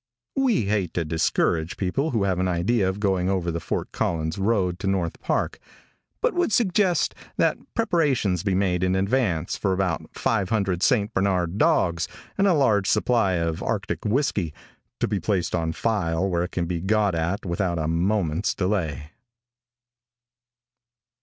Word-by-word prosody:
We 260 - +2
hate 100 -4 -1
to 85 - 0
discourage 80 +1 0
people 135 - 0
who 115 -7 0
have 95 -2 0
an 95 - +1
idea 95 +4 +1
of 95 +2 -4
going 95 -3 +1
over 90 -3 0
the 85 - -3
Fort - - -3
Collins 80 +1 -2
road 95 -4 +1
to 95 - -3
North 95 -4 -1
Park, - - -1 0.6
but - - +2
would 350 -8 +1
suggest 190 -5 +2 0.2
that - - +2 0.2
preparations 145 - +1
be 100 -1 0
made 90 -2 +1
in 95 0 +1
advance 100 -4 0
for 95 - 0
about 95 -4 -1
five 100 -5 0
hundred 95 -5 0
St. 110 -2 +2
Bernard 95 -1 0
dogs 90 - +2 0.3
and 200 - +3
a 180 - +4
large 110 -9 +3
supply 115 -6 +2
of 85 -2 -1
arctic - - -2
whisky, 105 - 0 0.4
to - - +1
be 100 -1 -1
placed 90 -1 -1
on 80 -1 0
file 95 -3 0
where 90 -2 0
it 90 - -8
can 85 - -1
be 85 -1 -3
got 100 0 +2
at 85 +5 -2
without 85 0 -1
a 80 -1 -1
moment's 85 +1 0
delay. 85 -7 -2
95 Hz, 160 wpm, -24 LUFS, 85-110 Hz, 0.6 s, a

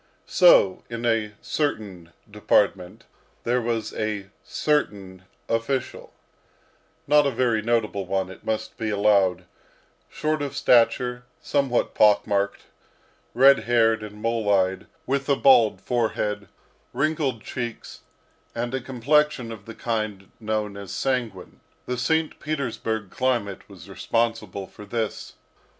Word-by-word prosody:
So, 135 - +5
in 120 0 -5
a 110 -3 0
certain 100 - -3 0.2
department 90 0 0 0.4
there 125 +1 +1
was 115 -2 -2
a 105 -2 -3
certain 100 -11 -2 0.2
official 130 +3 -2 0.9
not 150 0 +4
a - - +2
very 120 -3 +1
notable 110 -4 -1
one, 95 0 -1
it 95 - -13
must 110 0 -3
be 110 - -2
allowed 100 -3 +2 0.6
short 155 0 -2
of 140 -1 -4
stature, 125 +1 +3
somewhat 140 -4 0
pock 105 -1 +4
marked, 100 -1 -1 0.7
red 135 +2 +6
haired, 115 -2 +3
and 105 0 -9
mole 115 -2 0
eyed, 95 -1 +1 0.2
with 140 +1 -1
a 140 - +4
bald 125 -6 +5
forehead, 105 -4 -1 0.5
wrinkled 140 -6 -1
cheeks, 120 -3 -6 0.5
and 120 +1 -3
a 130 - -1
complexion 130 0 +1
of 105 -3 -10
the 115 - -8
kind 110 -4 -3
known 105 -2 -2
as 100 -2 -8
sanguine. 120 -8 -3 0.3
The 125 - -2
St. 160 +3 0
Petersburg 115 -8 -3
climate 120 -7 -2
was - - -13
responsible 115 -4 -2
for 105 - -13
this. 110 +1 -4
115 Hz, 125 wpm, -24 LUFS, 105-130 Hz, 0.9 s, red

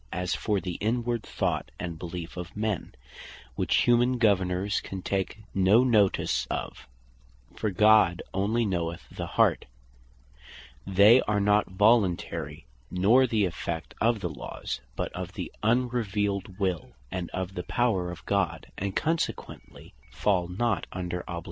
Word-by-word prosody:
As 90 -1 -2
for 105 -2 0
the 90 -1 -5
inward 120 +1 0
Thought, - - -2
and 85 -2 -5
beleef 85 0 -6
of 90 +2 -7
men, 105 -2 -2 0.6
which - - +2
humane 120 +1 +3
Governours 95 -3 +2
can 95 -1 -7
take 100 +2 -2
no 100 +5 +5
notice 110 -6 +2
of, - - -5 0.7
(for 110 - -1
God 105 -3 +4
onely 105 +5 +1
knoweth 85 -4 -3
the - - -5
heart) - - +3 1.2
they 105 +6 +7
are 105 -1 +2
not 105 +1 +3
voluntary, 100 - +1 0.2
nor 110 +9 +4
the 110 -4 +2
effect 85 -1 -4
of 115 -1 +2
the 90 - -2
laws, 70 -6 -6
but - - -3
of - - -6
the - - -5
unrevealed 105 -5 0
will, 95 -5 -2 0.2
and 90 -2 -4
of 95 0 -4
the 90 - -3
power 95 -2 0
of 85 -3 -9
God; 100 -1 -1
and 100 0 -3
consequently 165 +1 -3 0.2
fall 90 -4 0
not 110 +6 -1
under 90 -1 -3
obligation. 85 -1 -3
100 Hz, 140 wpm, -27 LUFS, 90-110 Hz, 1.2 s, they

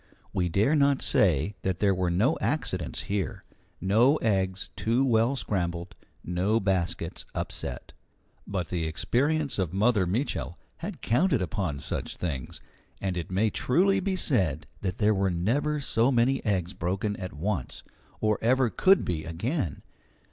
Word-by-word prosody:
We 90 -1 0
dare 105 - +2
not 140 -2 +3
say 95 0 +3
that 95 -2 -1
there 100 0 +3
were 90 -1 0
no 110 - +2
accidents 90 - -1
here, 100 -1 -3 0.4
no 115 - +4
eggs 95 -7 0
too 120 +4 +1
well 115 +1 +3
scrambled, 90 -7 -2 0.3
no 95 +6 +1
baskets 95 -4 -1
upset. - - -4 0.5
But 90 -5 -3
the 85 -3 -1
experience 140 - 0
of 90 -2 -1
Mother 105 -1 +3
Mitchel 100 - -2 0.2
had 180 +1 -6
counted 135 +3 +2
upon 90 -5 -3
such - - -4
things, 70 -8 -4 0.4
and 95 -2 -2
it 85 -2 -4
may 100 +4 +1
truly 195 +8 +2
be 190 0 -1
said 90 - +1 0.2
that 95 +1 -2
there 110 -3 +3
were 95 -1 +1
never 125 - 0
so 125 -2 +2
many 125 +2 +2
eggs 95 -3 0
broken 95 +4 -2
at 90 -1 -6
once, 85 0 -3 0.4
or 110 -1 +1
ever 125 0 +3
could 195 0 +4
be 80 -3 -2
again. 90 - -3
100 Hz, 150 wpm, -27 LUFS, 90-125 Hz, 0.5 s, no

